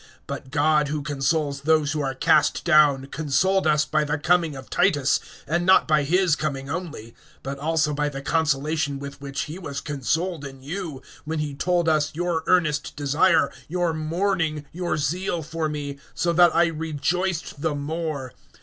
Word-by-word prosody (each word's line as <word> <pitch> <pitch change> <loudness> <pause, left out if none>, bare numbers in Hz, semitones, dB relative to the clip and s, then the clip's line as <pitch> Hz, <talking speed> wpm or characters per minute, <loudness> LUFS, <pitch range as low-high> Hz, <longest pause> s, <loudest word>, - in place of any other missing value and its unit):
(6)But 130 - -6
God, 150 +1 +2
who 150 0 -3
consoles 145 0 -1
those 155 -1 +2
who 150 -1 -1
are 135 -1 -2
cast 150 +2 +2
down, 150 -5 +5
consoled 160 +5 +1
us 150 -1 +3
by 155 -1 +1
the 145 0 -1
coming 165 0 +2
of 135 -1 -9
Titus; 145 -8 +2 0.3
(7)and 170 +4 +1
not 185 +1 +5
by 155 -1 +3
his 175 +3 +2
coming 140 -3 -3
only, 155 -10 -6 0.3
but 135 +1 -5
also 155 0 +1
by 145 0 0
the 135 -1 -6
consolation 150 -2 0
with 140 0 -8
which 140 0 -4
he 155 +5 -6
was 145 -6 -5
consoled 155 - -2
in 135 -2 -9
you, 155 -3 -5 0.2
when 160 +2 -3
he 150 -2 -2
told 175 +3 0
us 155 -2 +2
your 175 -1 -1
earnest 155 -5 +1
desire, 145 +5 +3 0.2
your 175 0 0
mourning, 160 -1 -1
your 175 -1 -2
zeal 175 +3 -1
for 160 +1 -3
me; 145 -2 -5 0.2
so 170 0 +1
that 175 0 +5
I 170 +1 +5
rejoiced 160 +1 -2
the 160 -2 0
more. 145 -2 -4
155 Hz, 170 wpm, -24 LUFS, 145-170 Hz, 0.3 s, down